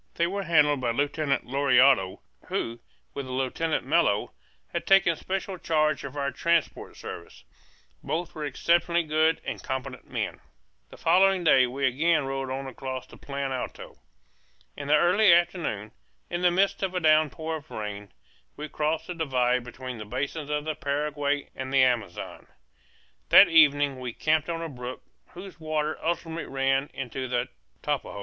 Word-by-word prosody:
They 170 Hz, -, +2 dB
were 195 Hz, +3 st, -2 dB
handled 150 Hz, -6 st, +3 dB
by 120 Hz, -, 0 dB
Lieutenant 145 Hz, +3 st, 0 dB
Lauriado, 130 Hz, -6 st, +3 dB, 0.3 s
who, 115 Hz, +1 st, -3 dB, 0.3 s
with 140 Hz, -2 st, -5 dB
Lieutenant 130 Hz, +4 st, -1 dB
Mello, 140 Hz, -9 st, +2 dB, 0.4 s
had -, -, -3 dB
taken 195 Hz, -4 st, +5 dB
special 190 Hz, +2 st, -4 dB
charge 155 Hz, -2 st, +1 dB
of 140 Hz, +1 st, -7 dB
our 140 Hz, 0 st, -1 dB
transport 170 Hz, -2 st, -1 dB
service; 85 Hz, -7 st, -9 dB, 0.6 s
both 165 Hz, +4 st, -3 dB
were 155 Hz, -, -6 dB
exceptionally 170 Hz, +4 st, +1 dB
good 155 Hz, +1 st, +2 dB
and -, -, -4 dB
competent 130 Hz, -1 st, -5 dB
men. -, -, -3 dB, 0.5 s
The -, -, -13 dB
following 190 Hz, 0 st, +3 dB
day 130 Hz, -6 st, +5 dB
we 135 Hz, +3 st, -2 dB
again 150 Hz, +4 st, +2 dB
rode 135 Hz, 0 st, -3 dB
on 135 Hz, +1 st, -4 dB
across 130 Hz, 0 st, -6 dB
the -, -, -15 dB
Plan 140 Hz, -1 st, -4 dB
Alto. 130 Hz, -1 st, -6 dB, 0.8 s
In 140 Hz, -, -7 dB
the 150 Hz, -, +5 dB
early 180 Hz, +6 st, +5 dB
afternoon, 170 Hz, -, +1 dB, 0.4 s
in 175 Hz, 0 st, -2 dB
the 180 Hz, -, +5 dB
midst 190 Hz, +3 st, +1 dB
of 190 Hz, -1 st, -2 dB
a -, -, +1 dB
downpour 155 Hz, 0 st, +2 dB
of 155 Hz, +1 st, -15 dB
rain, 105 Hz, -2 st, -6 dB, 0.5 s
we 150 Hz, +1 st, -5 dB
crossed 155 Hz, +2 st, -1 dB
the 180 Hz, -, -5 dB
divide 125 Hz, -6 st, +1 dB
between 125 Hz, 0 st, -8 dB
the -, -, -5 dB
basins 145 Hz, +7 st, -4 dB
of 150 Hz, 0 st, -2 dB
the 155 Hz, -, -1 dB
Paraguay 145 Hz, 0 st, -2 dB
and 130 Hz, 0 st, -5 dB
the 135 Hz, -1 st, +5 dB
Amazon. 115 Hz, -8 st, -2 dB, 0.8 s
That -, -, +9 dB
evening 145 Hz, -4 st, +4 dB
we 125 Hz, -2 st, -5 dB
camped 155 Hz, +3 st, +1 dB
on 165 Hz, 0 st, -3 dB
a -, -, -3 dB
brook 125 Hz, -3 st, -7 dB, 0.3 s
whose 180 Hz, -1 st, -10 dB
waters 155 Hz, -1 st, -2 dB
ultimately 165 Hz, 0 st, -2 dB
ran 135 Hz, +1 st, +1 dB
into 130 Hz, 0 st, -5 dB
the 120 Hz, -1 st, -1 dB, 0.3 s
Tapajos. 100 Hz, -, -2 dB
145 Hz, 160 wpm, -27 LUFS, 130-165 Hz, 0.8 s, That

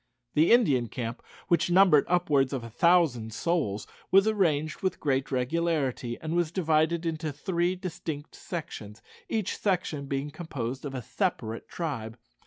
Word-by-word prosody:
The 155 Hz, +3 st, +4 dB
Indian 145 Hz, -, +4 dB
camp, 115 Hz, 0 st, -5 dB, 0.3 s
which 175 Hz, -1 st, +2 dB
numbered 175 Hz, -5 st, +6 dB
upwards 145 Hz, -7 st, +2 dB
of 130 Hz, -3 st, -3 dB
a 115 Hz, -, -8 dB
thousand 145 Hz, -6 st, +3 dB
souls, 145 Hz, -, -1 dB, 0.2 s
was 195 Hz, +3 st, +5 dB
arranged 155 Hz, -8 st, +1 dB
with 190 Hz, -2 st, -1 dB
great 135 Hz, -2 st, 0 dB
regularity, 135 Hz, -3 st, 0 dB
and 160 Hz, +1 st, -3 dB
was 175 Hz, -2 st, +2 dB
divided 165 Hz, -1 st, +1 dB
into 160 Hz, -1 st, -2 dB
three 175 Hz, +5 st, -1 dB
distinct 165 Hz, -5 st, -6 dB
sections, 115 Hz, -, -7 dB, 0.3 s
each 220 Hz, -4 st, -1 dB
section 175 Hz, -8 st, -1 dB
being 140 Hz, +2 st, -2 dB
composed 140 Hz, -5 st, -5 dB
of 135 Hz, -1 st, -5 dB
a 125 Hz, -, -4 dB
separate 115 Hz, -, -2 dB
tribe. 125 Hz, -9 st, -4 dB
155 Hz, 145 wpm, -28 LUFS, 130-175 Hz, 0.3 s, numbered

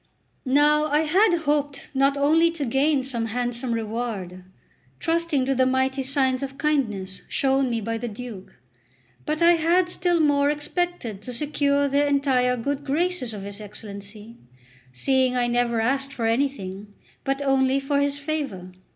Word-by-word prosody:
Now 295 Hz, +3 st, +4 dB
I 300 Hz, 0 st, +2 dB
had 345 Hz, +2 st, +3 dB
hoped 290 Hz, -2 st, -1 dB
not 275 Hz, +1 st, +2 dB
only 315 Hz, +4 st, +4 dB
to 300 Hz, -4 st, -3 dB
gain 270 Hz, +3 st, +2 dB
some 235 Hz, -4 st, -1 dB
handsome 245 Hz, +2 st, -2 dB
reward, 220 Hz, -5 st, -4 dB, 0.6 s
trusting 330 Hz, -5 st, 0 dB
to 270 Hz, -, +1 dB
the 260 Hz, 0 st, +2 dB
mighty 260 Hz, +1 st, +1 dB
signs 265 Hz, -1 st, +1 dB
of 270 Hz, 0 st, -5 dB
kindness 215 Hz, -11 st, -1 dB
shown 270 Hz, -1 st, +1 dB
me 230 Hz, -1 st, -1 dB
by 225 Hz, +1 st, -3 dB
the 240 Hz, -, -4 dB
Duke, 220 Hz, -3 st, -9 dB, 0.7 s
but 310 Hz, +2 st, 0 dB
I 340 Hz, -, +7 dB
had 345 Hz, +3 st, +2 dB
still 355 Hz, -1 st, +1 dB
more 290 Hz, -2 st, +3 dB
expected 295 Hz, -, -3 dB
to 250 Hz, -, -7 dB
secure 285 Hz, +1 st, +1 dB
the 285 Hz, +1 st, +2 dB
entire 265 Hz, -3 st, +2 dB
good 280 Hz, +4 st, -3 dB
graces 295 Hz, -2 st, -1 dB
of 205 Hz, -2 st, -7 dB
his 200 Hz, +1 st, -8 dB
Excellency, 210 Hz, +2 st, -9 dB, 0.5 s
seeing 255 Hz, -, +1 dB
I 245 Hz, -, +2 dB
never 240 Hz, -1 st, +1 dB
asked 270 Hz, +4 st, 0 dB
for 235 Hz, -4 st, -3 dB
anything, 210 Hz, -5 st, -2 dB, 0.3 s
but 270 Hz, 0 st, -1 dB
only 270 Hz, 0 st, +2 dB
for 280 Hz, +1 st, 0 dB
his 285 Hz, 0 st, 0 dB
favour. 280 Hz, -12 st, -4 dB
270 Hz, 155 wpm, -24 LUFS, 230-290 Hz, 0.7 s, I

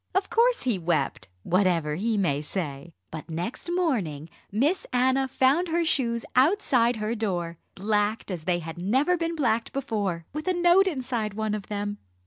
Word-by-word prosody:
Of 385 Hz, +1 st, 0 dB
course 475 Hz, +2 st, +3 dB
he 235 Hz, -7 st, +1 dB
wept 160 Hz, -, -1 dB, 0.2 s
whatever 175 Hz, -5 st, +2 dB
he 215 Hz, +7 st, 0 dB
may 150 Hz, -8 st, +1 dB
say. 155 Hz, -1 st, -5 dB, 0.2 s
But 160 Hz, +1 st, -7 dB
next 175 Hz, -, -4 dB
morning 195 Hz, -, -1 dB, 0.2 s
Miss 285 Hz, -, +1 dB
Anna 260 Hz, +2 st, +2 dB
found 270 Hz, +7 st, +2 dB
her 335 Hz, +1 st, +1 dB
shoes 235 Hz, -7 st, 0 dB
outside 255 Hz, -, +3 dB
her 215 Hz, +1 st, -2 dB
door, 175 Hz, -7 st, -2 dB, 0.2 s
blacked 210 Hz, +1 st, 0 dB
as 170 Hz, -4 st, -5 dB
they 180 Hz, -1 st, +2 dB
had 165 Hz, 0 st, -7 dB
never 265 Hz, -, +2 dB
been 335 Hz, -1 st, -2 dB
blacked 230 Hz, -6 st, 0 dB
before, 205 Hz, -11 st, -2 dB
with 305 Hz, +4 st, -5 dB
a 370 Hz, -, +2 dB
note 350 Hz, +2 st, +5 dB
inside 245 Hz, -, -2 dB
one 220 Hz, -1 st, -1 dB
of 210 Hz, -2 st, -4 dB
them. 205 Hz, 0 st, -3 dB
220 Hz, 165 wpm, -26 LUFS, 175-275 Hz, 0.2 s, note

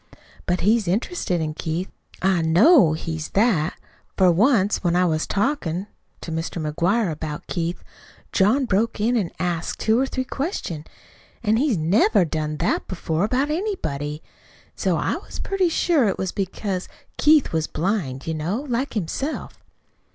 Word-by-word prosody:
But 180 Hz, +1 st, +1 dB
he's 215 Hz, 0 st, +3 dB
interested 190 Hz, -, -1 dB
in 155 Hz, -1 st, -2 dB
Keith 165 Hz, +4 st, -3 dB, 0.3 s
I 190 Hz, -2 st, +3 dB
KNOW 175 Hz, -, +6 dB
he's 160 Hz, 0 st, -4 dB
that, 190 Hz, -7 st, +2 dB, 0.4 s
for 185 Hz, -2 st, +5 dB
once, 205 Hz, +2 st, +3 dB
when 175 Hz, -1 st, +2 dB
I 180 Hz, +1 st, +4 dB
was 155 Hz, -2 st, 0 dB
talkin' 200 Hz, -, -1 dB, 0.4 s
to 165 Hz, -, -6 dB
Mr. 165 Hz, +2 st, -3 dB
McGuire 170 Hz, +6 st, +1 dB
about 150 Hz, -1 st, -5 dB
Keith, 170 Hz, +1 st, -3 dB, 0.5 s
John 225 Hz, +8 st, +3 dB
broke 220 Hz, +1 st, 0 dB
in 230 Hz, +4 st, +2 dB
an' 200 Hz, -8 st, 0 dB
asked 175 Hz, -2 st, -2 dB
two 220 Hz, +2 st, +2 dB
or 270 Hz, -, +1 dB
three 260 Hz, -1 st, -2 dB
questions, 255 Hz, -, -4 dB, 0.6 s
an' 215 Hz, 0 st, +3 dB
he's 260 Hz, -5 st, +2 dB
NEVER 185 Hz, +4 st, +3 dB
done 155 Hz, -1 st, -3 dB
that 170 Hz, -, 0 dB
before, 170 Hz, -2 st, -2 dB
about 260 Hz, +6 st, 0 dB
anybody. 155 Hz, -, -3 dB
An' -, -, -29 dB
so -, -, 0 dB
I -, -, 0 dB
was -, -, -10 dB
pretty 390 Hz, -3 st, 0 dB
sure 320 Hz, -6 st, +2 dB
it 195 Hz, -, 0 dB
was 190 Hz, -1 st, -2 dB
because 190 Hz, -1 st, -3 dB, 0.3 s
Keith 300 Hz, -, +4 dB
was 160 Hz, -1 st, 0 dB
blind, 160 Hz, -8 st, -2 dB
you 160 Hz, -, -2 dB
know, 170 Hz, -, -2 dB
like 250 Hz, +1 st, -2 dB
himself." 225 Hz, -, -3 dB
185 Hz, 160 wpm, -23 LUFS, 160-235 Hz, 0.6 s, KNOW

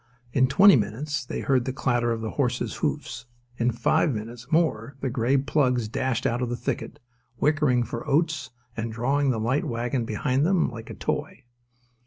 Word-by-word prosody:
In 130 Hz, 0 st, +4 dB
twenty 190 Hz, +8 st, +7 dB
minutes 135 Hz, +7 st, -1 dB
they 125 Hz, -, -5 dB
heard 130 Hz, -3 st, +2 dB
the 130 Hz, -, -1 dB
clatter 120 Hz, -2 st, 0 dB
of 115 Hz, -1 st, -2 dB
the 110 Hz, -, -3 dB
horses' 125 Hz, -3 st, -1 dB
hoofs: 120 Hz, -, -3 dB, 0.3 s
in 120 Hz, +1 st, +2 dB
five 125 Hz, +7 st, +2 dB
minutes 115 Hz, +2 st, -7 dB
more 140 Hz, -6 st, +1 dB
the 135 Hz, -2 st, -2 dB
grey 125 Hz, +2 st, +2 dB
plugs 130 Hz, -4 st, +1 dB
dashed 125 Hz, +2 st, -1 dB
out 120 Hz, +2 st, 0 dB
of 125 Hz, -, -1 dB
the 120 Hz, -, -2 dB
thicket, 120 Hz, -, -4 dB, 0.4 s
whickering 150 Hz, -5 st, +2 dB
for 115 Hz, 0 st, -6 dB
oats 155 Hz, -2 st, +1 dB, 0.3 s
and 115 Hz, 0 st, -3 dB
drawing 135 Hz, +5 st, +1 dB
the 120 Hz, -4 st, 0 dB
light 125 Hz, +6 st, +1 dB
wagon 120 Hz, +1 st, -1 dB
behind 125 Hz, +5 st, 0 dB
them 180 Hz, -4 st, +2 dB
like 115 Hz, -1 st, -9 dB
a -, -, -7 dB
toy. -, -, -3 dB
125 Hz, 180 wpm, -25 LUFS, 115-140 Hz, 0.4 s, twenty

